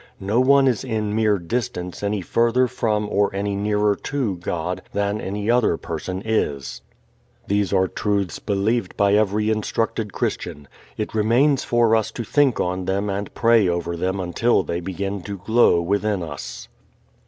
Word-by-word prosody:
No 105 +5 0
one 135 +1 +5
is 125 -5 +1
in 110 -4 -2
mere 110 -2 +3
distance 90 -1 -4
any 100 0 -1
further 120 +7 +2
from 110 -4 -1
or 105 0 +2
any 100 0 -1
nearer 105 0 +1
to 130 -9 -2
God 90 +1 -3
than 100 +1 -1
any 100 +2 -4
other 120 -7 +3
person 90 +4 -5
is. 75 - -1 0.6
These 100 -1 0
are 95 -1 +3
truths 100 -3 -1
believed 105 +1 -1
by 100 -1 +3
every 105 +1 +2
instructed 110 0 -1
Christian. 75 -4 -3 0.3
It 105 - -3
remains 120 +6 +3
for 120 -2 +3
us 110 -1 +1
to 120 - -4
think 140 +2 +2
on 90 +1 -1
them 100 +2 -1
and 100 +1 -4
pray 115 -4 +4
over 85 0 -1
them 95 +3 -2
until 95 +7 +1
they 85 - -3
begin 95 +2 -4
to 100 +2 -6
glow 110 -2 +3
within 100 +1 0
us. 75 -4 -7
105 Hz, 160 wpm, -22 LUFS, 95-115 Hz, 0.6 s, one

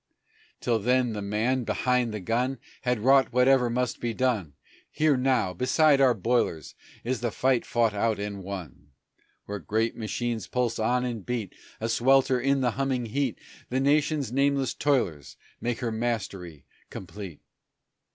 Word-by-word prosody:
Till 115 -2 +1
then 125 +1 +1
the 105 - -4
man 110 +6 0
behind 125 0 0
the 105 - -4
gun 125 +7 -1 0.2
Had 125 -3 0
wrought 135 +3 +4
whatever 125 0 +4
must 125 +1 -1
be 115 -2 -3
done 115 - 0 0.4
Here, 155 -1 +2
now, 125 -8 +1
beside 140 - +3
our 130 -3 +5
boilers 105 - 0 0.3
is 125 +1 -2
the 120 - 0
fight 130 +3 +1
fought 115 -3 +2
out 110 +1 0
and 100 -1 -5
won; 85 -7 -8 0.5
Where 105 0 -5
great 110 +7 -1
machines 115 +1 -3
pulse 120 -3 -1
on 125 +3 +1
and 115 -5 -4
beat, 115 -4 -3 0.3
A 115 - -2
swelter 130 +2 +3
in 135 +1 +2
the 125 -2 +2
humming 130 0 -1
heat 130 +2 -1 0.3
The 130 - 0
Nation's 145 -1 +1
nameless 140 -1 +1
toilers 95 - -1 0.2
make 120 +1 -2
her 120 -2 -1
mastery 100 - -4 0.2
complete. 95 -3 -9
120 Hz, 150 wpm, -27 LUFS, 105-130 Hz, 0.5 s, our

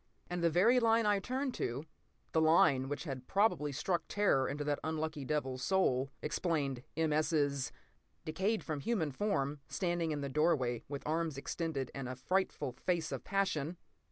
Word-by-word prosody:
And 175 -1 -2
the 170 - +5
very 210 +10 +5
line 230 -1 +4
I 210 - +4
had 200 -1 -1
turned 260 +1 -1
to, 130 +6 -2 0.5
the 160 - +3
line 150 -4 +4
which 145 - -3
had 130 -5 -6
probably 195 -8 +2
struck 175 +6 -1
terror 165 -11 +2
to 145 +1 -3
that 145 0 0
unlucky 155 -1 -2
devil's 130 -3 -1
soul, 135 -6 +2
explained 150 -5 -1 0.2
M. 160 -2 +2
S.'s 145 -3 +1 0.5
"decayed 190 +8 0
human 160 +2 -1
form, 145 -4 -1
standing 175 -3 -1
in 150 -2 -2
the 140 - -2
doorway 135 -5 +1
with 140 0 -6
arms 160 -1 -1
extended 140 -2 -3
and 135 -2 -5
a 130 - -4
frightful 180 +1 0
face 160 +5 -1
of - - -4
passion!" 180 -5 0
155 Hz, 165 wpm, -34 LUFS, 140-180 Hz, 0.5 s, the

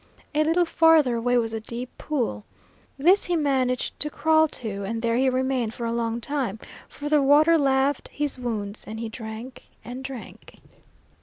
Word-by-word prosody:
A 305 +1 +3
little 335 +3 +2
farther 320 -7 +4
away 245 +2 +1
was 225 -2 0
a 225 - -2
deep 240 +3 -7
pool. 240 - -2 0.5
This 360 +8 +4
he 350 - 0
managed 265 -5 0
to 300 - 0
crawl 315 +1 +3
to, 215 -8 -5
and 225 +3 -4
there 230 0 +1
he 260 +2 +3
remained 255 -3 -1
for 235 - -4
a 230 - -1
long 230 0 -1
time, 255 -5 -2 0.3
for 290 - -7
the 300 -1 +3
water 295 +4 +5
laved 275 -1 +1
his 290 -3 -3
wounds, 215 -4 -4
and 220 +1 -6
he 230 -1 -4
drank 225 +3 -9 0.2
and 250 +2 -7
drank. 265 -3 -9
255 Hz, 175 wpm, -25 LUFS, 230-295 Hz, 0.5 s, water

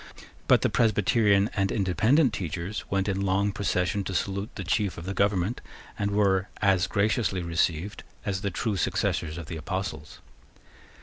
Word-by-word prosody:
But - - +5
the - - +3
Presbyterian 105 -2 +3
and 100 -1 +1
Independent 110 - +2
teachers 90 +2 -4
went 95 0 0
in 100 -1 -1
long 100 +1 +1
procession 100 0 0
to 95 - -4
salute 100 +3 -2
the 95 - -5
chief 95 +1 0
of 85 - -7
the 95 - -3
government, 100 +2 0 0.3
and 100 -1 -1
were 100 -2 +2
as 95 -3 +3
graciously 100 -3 0
received 85 +3 -1 0.2
as 95 -2 -2
the 100 - -1
true 105 +2 -2
successors 80 -2 -1
of 85 - -6
the 80 +1 -6
Apostles. 80 -2 -5
100 Hz, 160 wpm, -27 LUFS, 90-105 Hz, 0.3 s, But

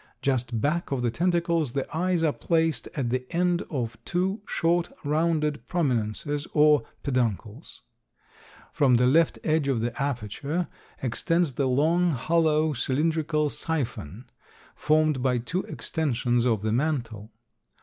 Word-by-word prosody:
Just 125 -4 0
back 150 +8 -1
of 130 -3 -1
the 120 - +1
tentacles 170 -4 0
the 135 - -1
eyes 175 0 +1
are 155 -3 +2
placed 165 -5 0
at 130 -6 -1
the 130 0 0
end 175 0 +1
of 120 -6 -3
two 190 +4 -1
short, 170 +1 +1
rounded 150 -3 0
prominences 145 -1 -1
or 150 -1 +5 0.2
peduncles. 120 - -2 0.9
From 135 -4 +4
the 125 +1 +4
left 160 +6 +3
edge 155 -2 +1
of 135 -4 +1
the 115 +1 -2
aperture 140 - -2 0.4
extends 165 +5 0
the 135 +1 0
long, 160 +6 +2
hollow, 155 +3 +2
cylindrical 150 +3 0
siphon 125 - -4 0.5
formed 155 -3 +2
by 125 -1 +2
two 165 +11 -2
extensions 125 -4 -1
of 110 -4 +1
the 110 - 0
mantle. 120 -5 -1
145 Hz, 130 wpm, -26 LUFS, 125-165 Hz, 0.9 s, or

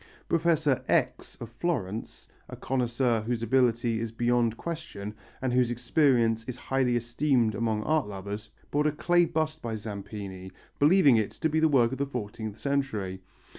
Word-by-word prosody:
Professor 160 -5 +2
X. - - 0
of 120 - -6
Florence, 115 - -3 0.2
a - - -7
connoisseur 120 -2 0
whose 115 +1 -2
ability 120 -1 +2
is 115 -1 -3
beyond 120 0 +1
question 105 -12 -6 0.3
and 130 -2 0
whose 125 -1 +3
experience 120 -3 +2
is 125 - -5
highly 130 -1 0
esteemed 120 0 +1
among 110 0 -1
art 155 -2 +1
lovers, 100 +2 -6 0.2
bought 150 +1 +2
a - - +2
clay 175 +3 +3
bust 155 -1 -2
by 115 -2 -3
Zampini, 100 -3 -7 0.3
believing 145 -4 +6
it 110 -2 +1
to 160 - -1
be 155 +1 +1
work 135 -7 +4
of 135 - -5
the 140 - 0
fourteenth 110 -4 -5
century. 110 -10 -2
120 Hz, 155 wpm, -28 LUFS, 110-140 Hz, 0.3 s, believing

